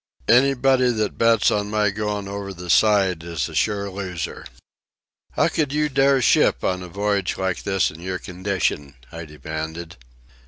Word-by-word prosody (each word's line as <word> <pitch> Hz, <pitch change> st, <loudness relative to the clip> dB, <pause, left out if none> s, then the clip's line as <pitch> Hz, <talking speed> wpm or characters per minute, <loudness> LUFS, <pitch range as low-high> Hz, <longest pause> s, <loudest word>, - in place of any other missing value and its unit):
Anybody 130 Hz, +1 st, +4 dB
that 110 Hz, -3 st, -2 dB
bets 115 Hz, -2 st, +4 dB
on 105 Hz, 0 st, -1 dB
my 105 Hz, -1 st, +1 dB
going 105 Hz, -1 st, -3 dB
over 100 Hz, 0 st, -6 dB
the 90 Hz, 0 st, -4 dB
side 100 Hz, -5 st, +3 dB
is 85 Hz, -4 st, -3 dB
a -, -, -11 dB
sure 100 Hz, -2 st, 0 dB
loser." 95 Hz, -4 st, -6 dB, 0.9 s
"How -, -, +2 dB
could 150 Hz, -4 st, -1 dB
you 150 Hz, +1 st, 0 dB
dare 135 Hz, -1 st, +3 dB
ship -, -, +3 dB
on 90 Hz, 0 st, -1 dB
a 90 Hz, -, -7 dB
voyage 100 Hz, 0 st, -1 dB
like 95 Hz, -1 st, -2 dB
this 95 Hz, -1 st, 0 dB
in 80 Hz, -, -13 dB
your 90 Hz, +1 st, -3 dB
condition?" 90 Hz, -7 st, -3 dB, 0.2 s
I 85 Hz, 0 st, -7 dB
demanded. 80 Hz, +3 st, -7 dB
100 Hz, 160 wpm, -22 LUFS, 90-110 Hz, 0.9 s, Anybody